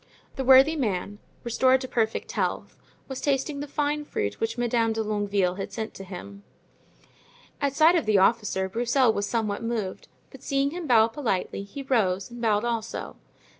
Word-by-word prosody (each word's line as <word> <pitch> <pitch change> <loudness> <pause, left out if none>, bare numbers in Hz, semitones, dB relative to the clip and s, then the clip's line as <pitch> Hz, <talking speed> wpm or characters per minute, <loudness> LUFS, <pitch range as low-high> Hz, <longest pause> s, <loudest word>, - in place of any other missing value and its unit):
The 265 - -2
worthy 265 +4 +7
man, 205 - -2 0.2
restored 260 +2 +3
to 260 - -5
perfect 225 -3 -1
health, - - -2 0.3
was 265 -1 -6
tasting 280 +1 0
the 290 - -5
fine 295 +1 -1
fruit 100 - -3
which 225 +1 -2
Madame 235 -2 +1
de 220 0 -1
Longueville 205 -3 0
had 195 - -5
sent 220 -1 -5
to 195 - -9
him. 200 +2 -9 1.2
At 280 -1 0
sight 315 +3 +6
of 320 -10 0
the 215 -2 +4
officer 195 -1 +2
Broussel 240 +3 +2
was 205 -1 -2
somewhat 220 -2 -1
moved, 230 -5 -3 0.2
but - - -13
seeing 275 0 0
him 345 -1 -5
bow 225 -3 +5
politely 225 -7 -2
he 200 +8 -8
rose 205 -6 0
and 240 0 -9
bowed 215 -1 +2
also. 230 -1 -4
230 Hz, 170 wpm, -26 LUFS, 205-265 Hz, 1.2 s, worthy